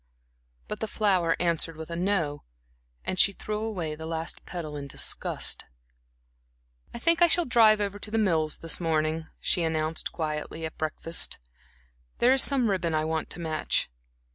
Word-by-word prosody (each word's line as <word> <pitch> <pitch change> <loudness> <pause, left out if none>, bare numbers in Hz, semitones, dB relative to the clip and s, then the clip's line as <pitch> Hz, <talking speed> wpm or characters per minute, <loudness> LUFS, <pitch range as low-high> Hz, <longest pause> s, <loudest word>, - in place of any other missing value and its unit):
But - - -5
the 220 - -2
flower 185 -7 +2
answered 165 -2 0
with 160 +1 -8
a - - -3
"no," 170 -5 0 0.6
and 185 - -1
she 200 - +7
threw 210 +2 -4
away 190 -8 -3
the 160 +1 -7
last 165 0 -4
petal 160 -4 -5
in 140 -1 -5
disgust. - - 0 1.3
"I - - -7
think 335 +7 +2
I 345 - +8
shall 345 +1 +2
drive 225 -4 +6
over 205 0 -2
to 210 - -4
The 225 - -1
Mills 165 -8 +2
this 165 - -4
morning," 160 -1 0
she 175 - +1
announced 160 -1 -1
quietly 155 0 -4
at 160 - -4
the - - -34
breakfast 160 +1 0
table. - - -14 0.7
"There 250 +2 +5
is 270 - +6
some 255 -6 +4
ribbon 170 -4 0
I 155 0 +1
want 160 0 -2
to - - -4
match." 155 - 0
170 Hz, 175 wpm, -27 LUFS, 160-210 Hz, 1.3 s, I